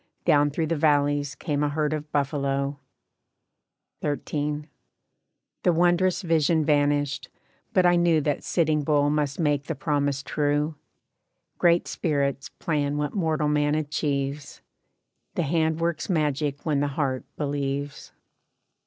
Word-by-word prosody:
Down 145 0 +4
through 160 +3 -1
the 165 - -1
valleys 145 -2 +2
came 145 -3 -2
a 150 - +2
herd 150 +1 0
of 150 0 -5
buffalo. 140 -1 -1 1.2
XIII. 150 0 -2 1.0
"The 180 - +3
wondrous 175 +3 +2
vision 160 -1 +2
vanished, 145 -2 +1 0.4
but 185 -5 +3
I 175 0 +5
knew 170 -2 +4
That 145 -1 -1
Sitting 155 -3 +1
Bull 145 0 +2
must 145 -2 -1
make 145 -3 +1
the 165 - -3
promise 145 -1 -1
true. 150 +1 0 0.9
Great 170 0 +3
Spirits 140 -4 -1
plan 145 -2 -1
what 150 0 -2
mortal 160 -5 0
man 150 0 +2
achieves, 145 -2 -2 0.7
The 175 - +1
hand 160 +1 +1
works 165 0 -1
magic 150 -4 0
when 150 -3 +1
the 145 - +1
heart 135 -4 0
believes. 140 -1 -3
150 Hz, 125 wpm, -25 LUFS, 145-160 Hz, 1.2 s, I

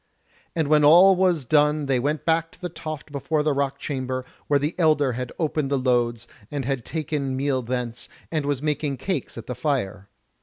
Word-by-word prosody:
And 160 -3 +1
when 150 0 +4
all 175 +6 +8
was 180 -6 +2
done 150 +2 +3
they 135 -2 +1
went 145 +4 -1
back 165 0 +1
to - - -18
the 180 - -4
toft 155 -3 -7
before 150 +2 -1
the 150 -1 +2
rock 140 0 -1
chamber, 130 -3 -3 0.2
where 145 - +4
the 145 +4 -1
elder 155 -5 +3
had 125 0 -4
opened 155 -3 -1
the 140 - +1
loads, 120 -2 0 0.2
and 140 -3 -3
had 135 -2 -2
taken 145 -3 -3
meal 135 -1 0
thence, 125 -1 -4 0.2
and 155 -3 0
was 145 -1 -1
making 150 -2 -1
cakes 150 -2 -3
at 115 - -7
the 125 - -4
fire. 110 -7 -2
145 Hz, 195 wpm, -24 LUFS, 130-155 Hz, 0.2 s, all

